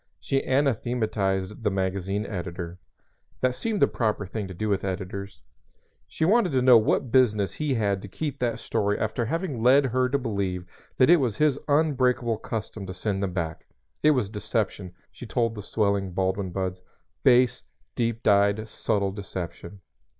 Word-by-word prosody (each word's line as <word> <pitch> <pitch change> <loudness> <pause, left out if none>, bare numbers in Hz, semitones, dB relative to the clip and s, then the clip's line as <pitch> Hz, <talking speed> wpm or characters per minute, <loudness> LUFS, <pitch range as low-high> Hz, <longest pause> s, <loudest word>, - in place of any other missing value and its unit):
She 135 0 0
anathematized 110 -7 0
the 105 - +3
magazine 95 +1 -1
editor. 90 -2 -5 0.6
(That 130 0 +2
seems 215 - -2
the - - +6
proper 105 -3 -1
thing 100 +2 -4
to 95 - -8
do 110 +5 -2
with 100 -2 0
editors.) 100 +1 -5 0.7
She 160 - -1
wanted 205 -3 +3
to 130 - +3
know 125 -1 +8
what 115 +2 0
business 105 -7 +3
he 150 -4 -1
had 100 -4 0
to 100 - -8
keep 145 +6 -4
that 120 -2 0
story 105 0 -1
after 110 +2 -1
having 160 -3 -2
led 135 +4 +5
her 130 0 +1
to 140 - +2
believe 100 -8 -2 0.3
that 130 +5 +6
it 175 - +8
was 125 -8 -1
his 150 -2 +2
unbreakable 130 -6 +2
custom 110 -3 -5
to 95 - -6
send 95 +1 -2
them 95 -2 -2
back. 85 -3 -4 0.3
It 155 - +5
was 115 -6 0
deception, 105 -3 -3 0.2
she 110 +5 -10
told 115 -1 0
the 105 - -7
swelling 100 -2 0
Baldwin 95 +1 -1
buds, 90 0 -3 0.4
base, 125 - +4 0.3
deep 115 -1 -1
dyed, 100 +1 +3
subtle 100 -2 -1
deception. 95 -1 -7
105 Hz, 165 wpm, -26 LUFS, 95-125 Hz, 0.7 s, know